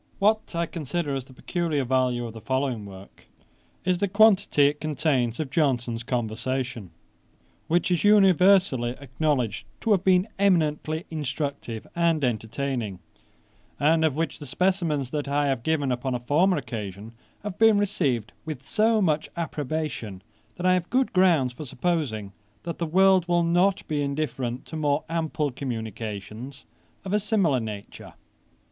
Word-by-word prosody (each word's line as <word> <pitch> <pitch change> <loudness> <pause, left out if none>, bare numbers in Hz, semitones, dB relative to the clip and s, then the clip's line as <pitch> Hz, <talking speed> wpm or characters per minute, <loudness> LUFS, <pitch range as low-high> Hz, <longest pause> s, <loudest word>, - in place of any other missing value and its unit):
What 215 -2 +1
I 170 0 +1
consider 160 -1 -3
as 135 -2 -3
the 130 - -16
peculiar 160 0 -1
value 125 -1 +1
of 115 - -7
the 115 - -10
following 130 -5 -1
work, 95 0 -13 0.6
is, 180 -1 +1
the 200 - +1
quantity 200 -6 +4
it 145 +1 +1
contains 145 -6 0
of 150 -4 -3
Johnson's 125 -6 0
conversation; 120 -2 -3 0.8
which 175 +2 +1
is 175 - +1
universally 190 - +4
acknowledged 130 -6 -1
to 225 - 0
have 195 -3 +3
been 185 +1 +4
eminently 160 -4 +1
instructive 140 -6 -4
and 165 -3 +2
entertaining; 120 -2 -2 0.8
and 160 +2 +3
of 155 -4 +2
which 165 0 -2
the 145 - -8
specimens 165 -5 0
that 145 -2 -2
I 145 +1 +1
have 135 -3 -1
given 145 -2 0
upon 125 +1 -1
a - - -2
former 160 +10 +2
occasion, 110 -4 -6 0.3
have 205 -3 -6
been 225 -2 +6
received 140 - 0
with 155 -4 -6
so 220 +6 +2
much 155 -3 +1
approbation, 150 - -4 0.3
that 180 - -5
I 185 - +5
have 180 -1 -1
good 260 +1 +1
grounds 170 -9 +3
for 155 - -8
supposing 125 - -2 0.3
that 170 -1 -5
the 170 - -1
world 190 +1 +4
will 175 -1 +2
not 180 +3 +2
be 150 -2 -1
indifferent 140 -4 -3
to - - -8
more 145 -1 +1
ample 155 -3 -1
communications 115 0 -6 0.4
of 190 - -3
a 210 - +4
similar 195 - +2
nature. 105 -3 -8
150 Hz, 150 wpm, -25 LUFS, 125-175 Hz, 0.8 s, been